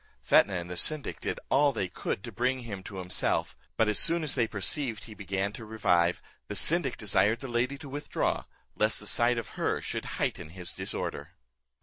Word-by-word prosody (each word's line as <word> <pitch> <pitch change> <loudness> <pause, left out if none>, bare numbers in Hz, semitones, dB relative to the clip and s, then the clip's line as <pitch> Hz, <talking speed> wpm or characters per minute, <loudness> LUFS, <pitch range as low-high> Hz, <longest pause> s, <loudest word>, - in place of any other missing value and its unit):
Fetnah 100 - +4
and 85 -1 -4
the 90 - -6
syndic 150 - +1
did - - -3
all 145 +1 +4
they 110 -7 -2
could 95 +1 -4
to 115 - -7
bring 125 +5 0
him 105 -5 -7
to 100 - -10
himself; 90 -1 -1 0.2
but 110 - +3
as 105 - +2
soon 170 0 +5
as 150 - +1
they 115 - +1
perceived 110 +2 0
he 110 - -9
began 100 0 -3
to 115 - -9
revive, 90 -6 +1 0.2
the 105 - -5
syndic 155 - +5
desired 105 +2 +2
the 135 - -7
lady 125 +3 -1
to 140 - -10
withdraw, 145 +2 -2 0.3
lest 110 +1 +2
the 105 - -8
sight 120 +3 +2
of 115 - -4
her - - +1
should - - -5
heighten - - -2
his 90 +1 -6
disorder. - - -4
110 Hz, 200 wpm, -29 LUFS, 95-130 Hz, 0.3 s, soon